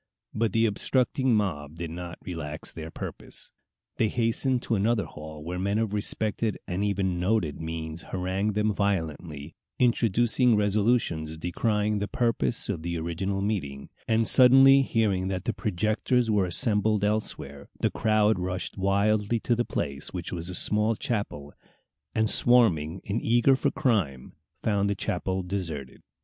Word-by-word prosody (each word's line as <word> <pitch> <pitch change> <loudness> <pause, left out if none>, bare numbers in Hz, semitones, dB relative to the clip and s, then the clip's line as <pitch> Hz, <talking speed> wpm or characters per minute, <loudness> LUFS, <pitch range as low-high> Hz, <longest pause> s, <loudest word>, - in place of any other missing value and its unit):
But 110 0 0
the 115 0 +3
obstructing 125 +3 +1
mob 80 -8 -2
did 85 -1 -5
not 85 0 -7
relax 80 -4 -5
their 80 0 -7
purpose. - - -8 0.5
They 110 - +2
hastened 120 +3 0
to - - -2
another 110 +1 +1
hall 75 0 -10
where 90 +3 -4
men 100 +2 0
of 110 -2 -1
respected 105 +1 -1
and 95 +1 -2
even 95 -3 0
noted 90 -5 0
names 80 0 -5
harangued 95 +3 -1
them 105 0 +1
violently, 80 -6 -2 0.2
introducing 120 0 +3
resolutions 105 -7 +1
decrying 105 +5 0
the 100 - -2
purpose 115 0 0
of 95 -6 -3
the 85 +1 -3
original 95 +4 -2
meeting; 70 -10 -3 0.2
and 110 0 +2
suddenly 135 +1 +7
hearing 105 -7 0
that 95 -1 -3
the 115 - 0
projectors 110 +4 0
were 100 -3 +2
assembled 105 +1 +2
elsewhere, 105 -10 -2
the - - +1
crowd 110 -2 +2
rushed 90 +2 -4
wildly 105 +3 +1
to 120 - +1
the 120 +1 0
place, 70 -1 -3
which 90 -2 -5
was 85 0 -5
a 90 - -5
small 105 +3 +2
chapel, 75 -12 -4 0.6
and, 110 0 +2
swarming 95 -10 +4
in 105 +4 -2
eager 120 +4 +4
for - - +1
crime, 95 - -1 0.3
found 100 -2 +1
the 100 - 0
chapel 95 0 -2
deserted. 85 -8 -5
100 Hz, 150 wpm, -27 LUFS, 85-110 Hz, 0.6 s, suddenly